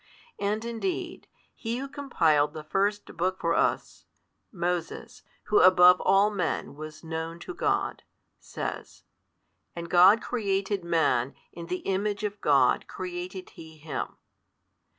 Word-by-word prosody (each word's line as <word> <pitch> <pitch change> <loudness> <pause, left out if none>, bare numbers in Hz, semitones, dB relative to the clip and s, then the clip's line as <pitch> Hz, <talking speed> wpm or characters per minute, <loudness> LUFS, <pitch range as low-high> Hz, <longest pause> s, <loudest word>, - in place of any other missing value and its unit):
And 210 +3 -1
indeed, 235 +11 -4 0.3
he 230 +1 -4
who 275 +2 -4
compiled 165 - +1
the 155 - -7
first 200 +6 0
book 185 +2 -1
for 165 0 +1
us - - -1 0.4
(Moses, 180 +6 -4 0.2
who 210 - +3
above 180 0 +7
all 195 +2 +4
men 180 -8 -2
was 155 +1 -9
known 165 +1 -5
to 365 - -7
God) - - -1 0.4
says, - - -6 0.7
And 170 0 -7
God 185 +5 +7
created 200 -5 -2
man, 155 -7 +1 0.2
in 170 0 -9
the 180 +1 -4
Image 200 +2 -1
of 205 -1 -4
God 135 -4 +3
created 185 0 -6
He 160 -1 -13
him. 150 -3 -5
185 Hz, 130 wpm, -27 LUFS, 165-205 Hz, 0.7 s, above